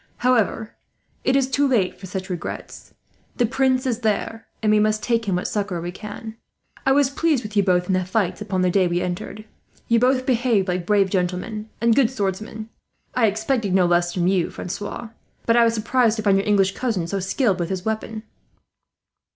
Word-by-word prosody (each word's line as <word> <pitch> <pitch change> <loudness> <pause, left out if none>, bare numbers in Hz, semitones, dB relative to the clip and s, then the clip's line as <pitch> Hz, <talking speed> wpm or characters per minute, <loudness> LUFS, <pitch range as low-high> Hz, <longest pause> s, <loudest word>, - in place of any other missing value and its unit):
However, 225 -3 +1 0.5
it 260 - +2
is 270 -1 +3
too 280 +2 +2
late 215 -9 +1
for 190 - -9
such 190 +1 -5
regrets. 180 -3 -7 0.4
The 245 - +2
Prince 260 +2 +1
is 245 -3 -1
there, 225 0 -2 0.2
and 215 - +3
we 215 - +4
must 215 0 +1
take 230 -1 +1
him 195 -3 0
what 180 - -1
succour 200 -4 -2
we 175 +1 -4
can. 215 +3 -8 0.5
"I - - +5
was 280 -1 +3
pleased 300 -3 +1
with 210 0 -8
you 205 - +5
both, 180 -2 +2
in 190 - -1
the 185 0 +1
fights 185 +2 -1
upon 190 -3 -1
the 180 - +2
day 185 -1 +3
we 175 0 0
entered. 180 +4 -5 0.4
You 230 0 +3
both 255 +1 +2
behaved 240 -6 +2
like 180 -1 -2
brave 200 -2 +3
gentlemen 190 +4 -2
and 230 0 +3
good 255 -4 +4
swordsmen. 215 -1 -4 0.4
I 230 -3 +3
expected 220 -1 0
no 185 -2 +4
less 175 0 +2
from 175 -1 -1
you, 185 -2 +2
Francois; 205 +5 -6 0.4
but 230 - +3
I 240 - +6
was 230 0 +2
surprised 230 +1 +2
to 215 - -4
find 200 -2 +4
your 195 +1 0
English 195 -2 +3
cousin 220 -9 -1
so 195 +4 -2
skilled 190 +1 0
with 170 0 -2
his 190 -1 -4
weapon." 220 0 -3
210 Hz, 200 wpm, -22 LUFS, 185-235 Hz, 0.5 s, I